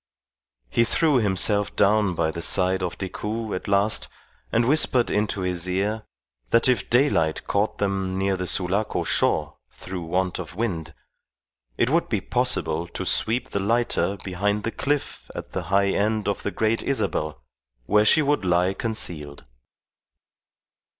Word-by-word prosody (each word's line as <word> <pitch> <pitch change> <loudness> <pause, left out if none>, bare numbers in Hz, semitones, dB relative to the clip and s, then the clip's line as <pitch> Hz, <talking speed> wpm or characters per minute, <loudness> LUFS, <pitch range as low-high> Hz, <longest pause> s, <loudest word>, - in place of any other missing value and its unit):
He 115 - +3
threw 150 +4 +2
himself 100 -1 +1
down 105 -2 +3
by 80 -1 0
the 85 - -6
side 95 +2 +2
of 90 -2 -3
Decoud 105 +4 -4
at 90 - -5
last, 100 +2 +2 0.4
and 115 +1 +2
whispered 130 -4 +3
into 105 -1 0
his 90 -1 -1
ear 105 +4 -1 0.4
that 115 - +4
if 125 -1 +1
daylight 120 - +2
caught 100 +2 0
them 95 -2 -1
near 95 0 +1
the 90 -1 -3
Sulaco 95 +5 0
shore - - 0
through 95 -1 -7
want 90 +3 -1
of 85 -2 -7
wind, 85 -8 -3 0.8
it 120 - +2
would 170 +2 +1
be 110 - 0
possible 90 -8 0
to - - -6
sweep 115 +3 +1
the - - -1
lighter 110 -1 +1
behind 100 +3 -1
the 115 - -2
cliff 145 +3 -3
at - - -7
the 90 - -4
high 100 +1 +3
end 105 +2 0
of 100 - -1
the - - -2
Great 110 +2 0
Isabel, 75 - -1 0.5
where 105 +8 +4
she 150 +8 +5
would 145 -6 +1
lie 90 +1 +2
concealed. 85 -11 -3
100 Hz, 150 wpm, -24 LUFS, 90-110 Hz, 0.8 s, she